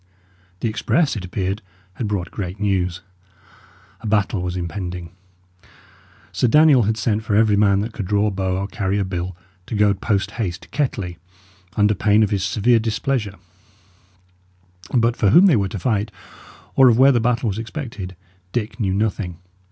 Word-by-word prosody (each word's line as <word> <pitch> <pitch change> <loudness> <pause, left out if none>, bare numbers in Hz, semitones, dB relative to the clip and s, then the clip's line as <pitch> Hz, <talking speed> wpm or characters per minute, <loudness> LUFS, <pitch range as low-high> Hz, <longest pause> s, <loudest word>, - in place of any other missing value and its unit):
The - - 0
express, 120 +8 +1
it 100 - -5
appeared, 95 +3 -3 0.3
had 110 +2 -4
brought 95 -5 -3
great 95 0 -5
news. 90 -3 0 1.0
A 115 - -7
battle 105 -2 +1
was 90 0 -3
impending. 90 0 -5 1.2
Sir 125 - +1
Daniel 150 0 +6
had 110 - 0
sent 110 -1 0
for 110 -2 -1
every 110 -1 +4
man 100 -1 +3
that 110 +2 -4
could 100 -5 -5
draw 105 +1 +2
a 105 - +1
bow 95 -1 -1
or 95 - -2
carry 100 0 -2
a 100 - 0
bill 90 -1 -4 0.3
to - - -4
go 105 -1 +4
post 100 0 -1
haste 90 -5 -3
to - - -16
Kettley, 95 - -2 0.6
under 105 0 +4
pain 105 +2 +3
of 105 - 0
his 100 -3 0
severe 105 +4 +3
displeasure; 110 -1 -2 1.6
but 120 -1 +2
for 105 - +2
whom 175 - +7
they 180 -8 +5
were 100 -3 0
to 105 - -5
fight, 105 +2 0 0.7
or 130 -1 +7
of 115 - +3
where 135 +2 +7
the 120 - +2
battle 120 0 +1
was 100 +2 -3
expected, 115 - -6 0.4
Dick 120 0 -3
knew 95 -4 0
nothing. 100 -4 -2
105 Hz, 175 wpm, -21 LUFS, 95-115 Hz, 1.6 s, whom